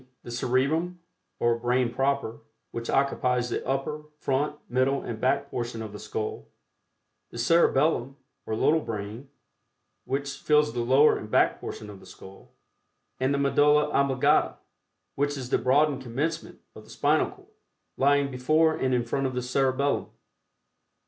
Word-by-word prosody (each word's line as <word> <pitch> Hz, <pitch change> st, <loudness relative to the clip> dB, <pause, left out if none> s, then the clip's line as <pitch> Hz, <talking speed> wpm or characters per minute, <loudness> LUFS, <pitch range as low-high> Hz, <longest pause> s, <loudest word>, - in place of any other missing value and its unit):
the 120 Hz, -, -8 dB
Cerebrum 140 Hz, +9 st, 0 dB, 0.4 s
or 120 Hz, 0 st, +1 dB
brain 120 Hz, 0 st, +1 dB
proper, 135 Hz, -4 st, -1 dB, 0.3 s
which 115 Hz, 0 st, -6 dB
occupies 125 Hz, -3 st, +1 dB
the -, -, -2 dB
upper, 135 Hz, +3 st, -2 dB
front, 145 Hz, +1 st, -1 dB
middle 130 Hz, +2 st, +1 dB
and 110 Hz, -2 st, -6 dB
back 135 Hz, +2 st, 0 dB
portion 120 Hz, -1 st, -4 dB
of 105 Hz, -2 st, -8 dB
the 105 Hz, -, -8 dB
skull; 110 Hz, -1 st, -5 dB, 0.8 s
the -, -, -10 dB
Cerebellum, 135 Hz, -1 st, +2 dB, 0.3 s
or 110 Hz, -, -1 dB
"little 155 Hz, +8 st, +3 dB
brain," 110 Hz, +1 st, -6 dB, 0.8 s
which 140 Hz, +1 st, -3 dB
fills 150 Hz, -5 st, +2 dB
the 120 Hz, -, -3 dB
lower 130 Hz, +5 st, +4 dB
and 105 Hz, -, -9 dB
back -, -, +2 dB
portion 105 Hz, -, -7 dB
of 100 Hz, -2 st, -10 dB
the -, -, -16 dB
skull; 95 Hz, +1 st, -14 dB, 0.7 s
and 130 Hz, +1 st, +1 dB
the 140 Hz, -, +1 dB
Medulla 145 Hz, +2 st, +3 dB
Oblongata, 135 Hz, -2 st, +2 dB, 0.6 s
which 145 Hz, +1 st, -1 dB
Is 125 Hz, -2 st, -7 dB
the -, -, +3 dB
broadened 140 Hz, +3 st, +2 dB
commencement 140 Hz, +7 st, -4 dB
of -, -, -12 dB
the -, -, -19 dB
spinal -, -, +1 dB
cord, -, -, -17 dB, 0.5 s
lying 140 Hz, 0 st, +2 dB
before 155 Hz, +5 st, +2 dB
and 130 Hz, -1 st, 0 dB
in 120 Hz, -1 st, 0 dB
front 135 Hz, +3 st, -1 dB
of 130 Hz, -, -5 dB
the 125 Hz, -, -2 dB
Cerebellum. 135 Hz, +2 st, 0 dB
130 Hz, 150 wpm, -26 LUFS, 120-140 Hz, 0.8 s, lower